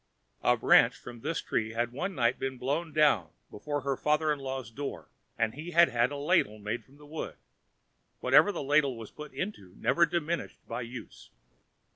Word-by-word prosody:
A - - +3
branch - - +5
from 120 - -10
this 165 +8 -2
tree 110 0 -1
had 120 +1 -1
one 180 +9 -3
night 120 -2 +2
been 135 -1 -3
blown 145 +7 -2
down 145 - +3 0.2
before 145 +7 -3
her 135 +1 -1
father 150 +2 +2
in 145 - -6
law's 130 -4 -5
door, 140 +4 -6 0.3
and 110 -1 +1
he 155 +5 -7
had 170 0 +6
had 120 0 +2
a 145 - -4
ladle 140 - +2
made 105 +3 -4
from 140 +2 -21
the 150 - -15
wood. 155 +2 -6 0.8
Whatever 205 - +5
the 175 - -4
ladle 140 -2 +2
was 115 -2 -9
put 150 0 -9
into 100 - -6
never 170 0 +3
diminished 170 0 -2
by 115 +2 -4
use. 120 -1 -9
140 Hz, 185 wpm, -30 LUFS, 120-155 Hz, 0.8 s, had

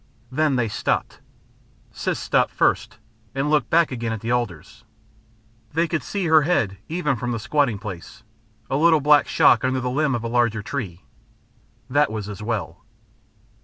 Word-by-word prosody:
Then 150 +1 +1
they 120 -2 +1
stopped. 110 +1 -2 0.7
Siss - - -2
stopped - - +1
first - - 0 0.4
and 140 +2 0
looked 150 -5 +2
back 165 -2 +3
again 115 -2 -3
at 110 - -3
the 115 - -3
alders. 110 -2 -4 0.9
They 165 +2 +1
could 160 -1 -1
see 200 -3 -3
her 160 -1 +5
head 115 - 0
even 160 -4 0
from 120 +1 -3
the - - -2
squatting 130 -1 +1
place, 95 -4 -9 0.4
a 135 - -1
little 160 +1 +5
black 150 +1 +4
shock - - +4
under 130 0 +1
the 125 0 -2
limb 140 -1 +1
of 120 - -4
the - - -2
larger 115 -3 +1
tree. 100 -10 -5 0.8
That 145 -1 +2
was 105 -2 -4
as 105 -1 -8
well. 105 -4 -4
125 Hz, 165 wpm, -23 LUFS, 110-150 Hz, 0.9 s, her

